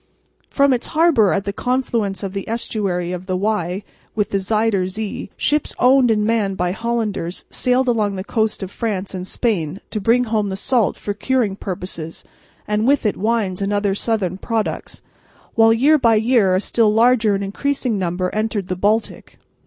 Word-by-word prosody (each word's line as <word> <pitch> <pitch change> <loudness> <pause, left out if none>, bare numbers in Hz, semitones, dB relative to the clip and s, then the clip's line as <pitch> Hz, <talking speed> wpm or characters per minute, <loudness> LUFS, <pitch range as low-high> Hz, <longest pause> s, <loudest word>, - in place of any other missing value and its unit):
From 280 -1 +3
its 245 - -2
harbour 305 - +4
at 200 - -1
the 200 - -2
confluence 230 -6 -1
of 195 -1 -4
the 195 +1 -5
estuary 195 -6 -2
of 180 +1 -6
the 185 -1 -1
Y 195 -2 -1 0.3
with 210 -2 -1
the 195 - +1
Zuyder 210 -1 +1
Zee 210 +2 -5
ships 295 +2 0
owned 255 0 +5
and 210 -2 +2
manned 210 -4 0
by 180 0 0
Hollanders 215 -5 -3
sailed 255 +1 +1
along 215 -4 +1
the 190 - -4
coasts 220 -1 -1
of 190 - -6
France 200 -5 -3
and 185 0 -5
Spain 190 -7 -1
to 215 - -3
bring 235 +5 +3
home 220 -3 -1
the 190 - -3
salt 225 +1 +1
for 205 - -4
curing 220 -1 0
purposes 180 -4 -6 0.4
and 210 +2 0
with 280 -3 +3
it 210 - +1
wines 210 -4 -1
and 200 +1 -1
other 205 -1 +1
southern 195 -4 -1
products, 225 0 -3 0.5
while 225 0 +5
year 285 +7 +4
by 230 -3 +4
year 220 -4 +3
a 185 - +1
still 220 0 +2
larger 225 -1 +4
and 195 - -2
increasing 245 +2 -1
number 180 0 -2
entered 215 -3 -2
the 185 - -1
Baltic. 210 +5 -1
210 Hz, 180 wpm, -20 LUFS, 195-230 Hz, 0.5 s, owned